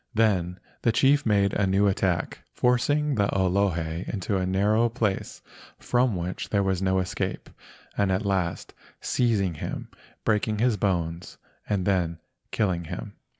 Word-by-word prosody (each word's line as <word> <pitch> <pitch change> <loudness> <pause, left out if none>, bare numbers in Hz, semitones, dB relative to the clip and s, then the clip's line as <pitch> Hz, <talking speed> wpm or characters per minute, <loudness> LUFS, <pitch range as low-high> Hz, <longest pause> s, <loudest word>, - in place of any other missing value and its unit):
Then 95 -5 +1 0.2
the 115 - +3
chief 140 +2 +3
made 100 -2 +3
a 100 - +1
new 95 +2 +3
attack, 95 -3 0 0.2
forcing 145 +4 +2
the 100 -5 +2
Olohe 90 -3 0
into 100 -1 -2
a 95 -1 0
narrow 105 +5 +2
place 110 -5 -2 0.3
from 120 -3 +1
which 90 +1 -4
there 100 -1 +2
was 95 -1 0
no 95 0 +2
escape, 90 -1 -3 0.4
and 100 -2 +1
at 95 +3 0
last 95 -4 -1 0.3
seizing 105 -7 +1
him, 75 - -6 0.4
breaking 110 0 +1
his 120 +1 +2
bones, 85 -4 -2 0.3
and 100 -3 0
then 90 -4 +1 0.3
killing 90 -5 0
him. - - -6
100 Hz, 145 wpm, -26 LUFS, 90-110 Hz, 0.4 s, the